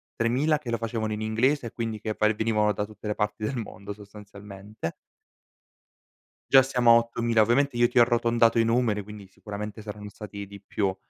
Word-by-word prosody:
3.000 130 Hz, +6 st, +1 dB
che 130 Hz, -, -8 dB
lo 115 Hz, -, 0 dB
facevano 110 Hz, -1 st, -3 dB
in 105 Hz, -, -4 dB
inglese, 120 Hz, +5 st, +1 dB
e -, -, -8 dB
quindi 115 Hz, -2 st, -4 dB
che 110 Hz, 0 st, -4 dB
va 105 Hz, -, +3 dB
e 110 Hz, -, +1 dB
venivano 105 Hz, -1 st, +1 dB
da 105 Hz, -, -2 dB
tutte 110 Hz, 0 st, -10 dB
le 105 Hz, -, -1 dB
parti 105 Hz, 0 st, -2 dB
del 125 Hz, +4 st, -2 dB
mondo 100 Hz, -3 st, -7 dB
sostanzialmente. 100 Hz, -2 st, -9 dB, 1.6 s
Già 135 Hz, -, +8 dB
siamo 125 Hz, -3 st, +3 dB
a -, -, +8 dB
8.000, 115 Hz, -1 st, +1 dB
ovviamente 120 Hz, +4 st, +2 dB
io 120 Hz, 0 st, +5 dB
ti -, -, -4 dB
ho -, -, +9 dB
arrotondato 115 Hz, -1 st, +3 dB
i -, -, +5 dB
numeri, 115 Hz, -2 st, +1 dB
quindi 105 Hz, -1 st, -11 dB
sicuramente 105 Hz, +2 st, -7 dB
saranno 105 Hz, -1 st, -8 dB
stati 100 Hz, 0 st, -8 dB
di 100 Hz, 0 st, -12 dB
più. 100 Hz, -1 st, -2 dB
110 Hz, 195 wpm, -26 LUFS, 105-120 Hz, 1.6 s, ho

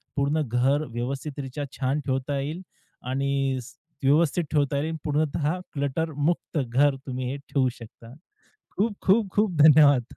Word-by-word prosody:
पूर्ण 145 Hz, +2 st, +1 dB
घर 135 Hz, +6 st, +1 dB
व्यवस्थित 135 Hz, +5 st, -4 dB
रित्या 135 Hz, +2 st, -5 dB
छान 135 Hz, +3 st, 0 dB
ठेवता 135 Hz, +1 st, -1 dB
येईल 155 Hz, +6 st, -4 dB, 0.5 s
आणि 135 Hz, 0 st, 0 dB
स -, -, -13 dB, 0.3 s
व्यवस्थित 155 Hz, +4 st, +3 dB
ठेवता 145 Hz, -2 st, +1 dB
येईल 160 Hz, +2 st, -2 dB
पूर्णतः 150 Hz, +2 st, 0 dB
क्लटरमुक्त 150 Hz, +3 st, -1 dB
घर 135 Hz, +3 st, +2 dB
तुम्ही 130 Hz, -1 st, -3 dB
हे 140 Hz, -, -4 dB
ठेवू 135 Hz, -2 st, 0 dB
शकता. 115 Hz, +1 st, -13 dB, 0.6 s
खूप-खूप-खूप 205 Hz, -2 st, +1 dB
धन्यवाद. 145 Hz, -4 st, +7 dB
140 Hz, 125 wpm, -25 LUFS, 135-155 Hz, 0.6 s, धन्यवाद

